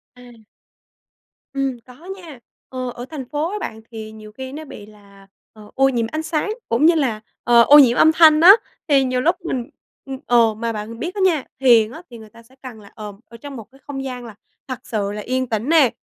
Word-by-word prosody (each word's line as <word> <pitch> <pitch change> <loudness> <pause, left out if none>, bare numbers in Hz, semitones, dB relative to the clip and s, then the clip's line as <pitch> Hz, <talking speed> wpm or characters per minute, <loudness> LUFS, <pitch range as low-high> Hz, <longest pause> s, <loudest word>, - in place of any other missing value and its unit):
À. 240 -3 -17 1.1
Ừm, 270 -2 -2
có 255 +7 -16
nha, 330 -9 -12 0.3
ờ, 255 -1 -5
ở 240 +1 -8
thành 290 -5 -7
phố 300 +3 -2
á 420 - -4
bạn 220 - -7
thì 220 -1 -8
nhiều 215 -1 -13
khi 260 +3 -8
nó 310 +3 -8
bị 210 -7 -11
là, 200 -2 -19 0.3
ờ, 210 -1 -15
ô 270 0 +3
nhiễm 235 -3 -1
ánh 310 0 -3
sáng 315 +4 -2 0.2
cũng 235 +6 +2
như 335 +1 +5
là, 245 -9 -1 0.2
ờ, 240 -1 +5
ô 290 +5 +8
nhiễm 245 -4 +5
âm 315 - +6
thanh 315 -1 +6
á. 355 +3 +10 0.4
Thì 275 -2 +4
nhiều 255 -1 -1
lúc 340 +6 +2
mình 245 -6 -4 0.4
ưm, 270 -1 -7
ờ, 230 -2 +3
mà 230 +2 -4
bạn 220 +2 -7
biết 350 +7 -5
á 400 - -3
nha, 340 -7 +2 0.2
thiền 235 -4 +4
á 320 - -10
thì 240 - -11
người 220 -1 -14
ta 230 +2 -18
sẽ 255 +3 -24
cần 250 -4 -10
là, 200 - -16
ờ, 210 -1 -8
ở 230 - -14
trong 280 +3 -10
một 230 - -8
cái 270 - -21
không 270 -2 -5
gian 250 -2 -6
là 225 -3 -11 0.3
thật 255 -2 -5
sự 205 -3 -3
là 210 +1 -6
yên 255 +3 -2
tĩnh 225 +4 -2
nè, 315 -6 +5
250 Hz, 235 wpm, -20 LUFS, 225-285 Hz, 1.1 s, á